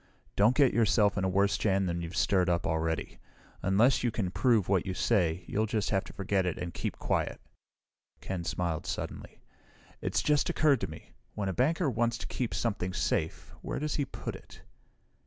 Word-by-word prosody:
"Don't 110 +5 +4
get 140 -3 +4
yourself 105 -2 +3
in 95 - -1
a 95 - +1
worse 100 +2 +2
jam 95 -2 +2
than 85 -1 -2
you've 85 +1 -6
stirred 95 -3 +3
up 85 +1 +1
already. 80 -2 -2 0.4
Unless 110 +8 +3
you 120 - +2
can 105 -5 -2
prove 115 -3 +2
what 95 -3 +2
you 95 - -4
say, 90 -7 +1
you'll 110 +4 0
just 105 -1 -1
have 95 -2 +1
to - - -11
forget 95 -1 0
it 90 -2 -2
and 85 -1 -5
keep - - -4
quiet." - - -1 0.8
Ken 95 -3 -4
smiled 85 -1 -2
suddenly. 85 - -5 0.6
"It - - -3
just 150 -1 +2
occurred 150 -4 +3
to - - -1
me 80 - -11 0.2
when 100 -2 -2
a - - -2
banker 155 - +1
wants 120 -1 0
to - - -7
keep 125 -3 -3
something 95 -5 -1
safe, 80 -2 -2
where - - -4
does 150 0 -2
he 145 - 0
put - - -6
it?" - - -14
100 Hz, 195 wpm, -30 LUFS, 90-115 Hz, 0.8 s, Don't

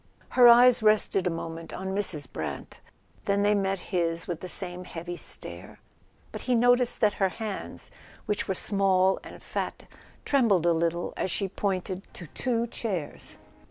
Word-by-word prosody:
Her 245 -1 +7
eyes 240 +1 +7
rested 215 -3 +3
a - - +3
moment 165 0 -6
on 190 +1 -4
Mrs. 185 -8 -2
Brant; - - -6 0.5
then 200 0 +1
they 205 +1 +4
met 195 -1 0 0.2
his 170 -2 0
with 170 -3 -3
the 185 - -7
same 180 0 0
heavy 175 +1 -6
stare. - - -6 0.5
But - - -7
he 250 - +1
noticed 245 +1 +3
that 210 -2 +4
her 190 - +4
hands, 215 0 -6 0.3
which 210 -1 -1
were 190 - -1
small 190 -1 +3
and - - -11
fat, - - -4 0.4
trembled 225 - +3
a 170 - +4
little 170 +1 -1
as - - -2
she 195 +2 -1
pointed 190 -1 -3
to 175 - -8
two 235 - -1
chairs. 200 -9 -4
195 Hz, 160 wpm, -27 LUFS, 175-215 Hz, 0.5 s, Her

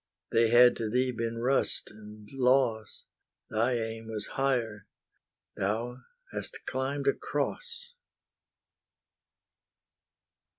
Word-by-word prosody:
They 115 0 +4
had 120 +1 +7
to 110 -2 -2
thee 125 +3 +1
been 115 -1 -3
rust 130 +4 +1
and 105 0 -13
loss; 125 -4 +1 0.5
Thy 115 +3 +2
aim 115 -1 -3
was 110 -2 -4
higher, 120 -6 -1 0.7
thou 115 +6 -2 0.3
hast - - -5
climbed 135 +2 -2
a 140 - +5
Cross. 475 - -4
120 Hz, 95 wpm, -29 LUFS, 110-130 Hz, 0.7 s, had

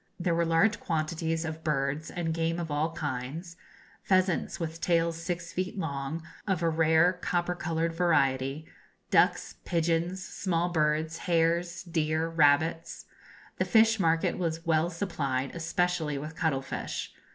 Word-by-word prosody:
There 175 -1 +1
were 170 0 +2
large 165 +7 +3
quantities 160 0 -1
of 160 0 -5
birds 145 +1 -1
and 165 -2 -2
game 165 +1 -1
of 165 -3 -4
all 150 +3 0
kinds 145 +5 -4 0.5
pheasants 185 -2 +1
with 165 0 -4
tails 170 -1 +2
six 170 0 -4
feet 185 +2 -3
long, 145 -1 -3 0.2
of 190 -4 0
a 165 - +3
rare 160 +2 +4
copper 180 -1 -1
coloured 165 -1 -1
variety, 145 -4 +1 0.5
ducks, - - +3
pigeons, 170 +2 0
small 175 -1 -1
birds, 155 0 0
hares, 170 +1 +1
deer, 160 -2 0
rabbits. 160 +1 +2 0.5
The - - +2
fish 225 -1 +4
market 165 -1 +1
was 165 -1 -2
well 160 0 +2
supplied, 140 -7 -2
especially 165 -2 0
with 155 +3 -6
cuttle 155 -6 0
fish. - - -5
165 Hz, 140 wpm, -29 LUFS, 155-175 Hz, 0.5 s, rare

